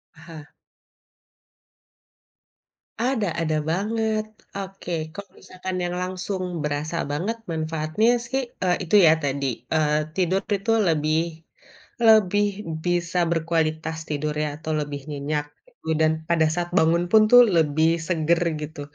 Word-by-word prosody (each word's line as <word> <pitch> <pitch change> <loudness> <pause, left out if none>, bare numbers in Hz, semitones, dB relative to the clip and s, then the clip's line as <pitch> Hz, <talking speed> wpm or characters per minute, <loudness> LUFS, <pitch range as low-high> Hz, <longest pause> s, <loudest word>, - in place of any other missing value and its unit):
Aha. 160 -2 -12 2.5
Ada 240 -4 0
ada 155 -1 0
banget. 215 +4 0 0.3
Oke, 195 -2 -7 0.2
kalau 200 0 -9
misalkan 185 0 -6
yang 175 0 -2
langsung 185 -2 -4
berasa 150 +2 -2 0.2
banget 195 +10 -2
manfaatnya 160 +6 0 0.2
sih, 265 +2 -1 0.2
eee, 180 -1 +2
itu 175 - +1
ya 155 - +7
tadi, 140 0 -1 0.3
eee, 150 -1 +2 0.2
tidur 185 +1 +1 0.2
itu 210 +4 -2 0.2
lebih 155 0 +1 0.9
lebih 205 -2 +5 0.4
bisa 175 0 0
berkualitas 160 -1 -1
tidur 150 0 -2
ya 150 - -1
atau 160 - -4
lebih 145 -1 -5
nyenyak 145 +1 -2 0.2
gitu. - - -11
Dan 155 0 +4 0.2
pada 165 -2 +3
saat 175 +1 -2
bangun 170 +1 +3
pun 220 -1 +7
tuh 245 0 +10 0.2
lebih 160 0 +3 0.2
seger 170 -1 +2 0.2
gitu. 150 -1 -7
165 Hz, 125 wpm, -24 LUFS, 155-190 Hz, 2.5 s, tuh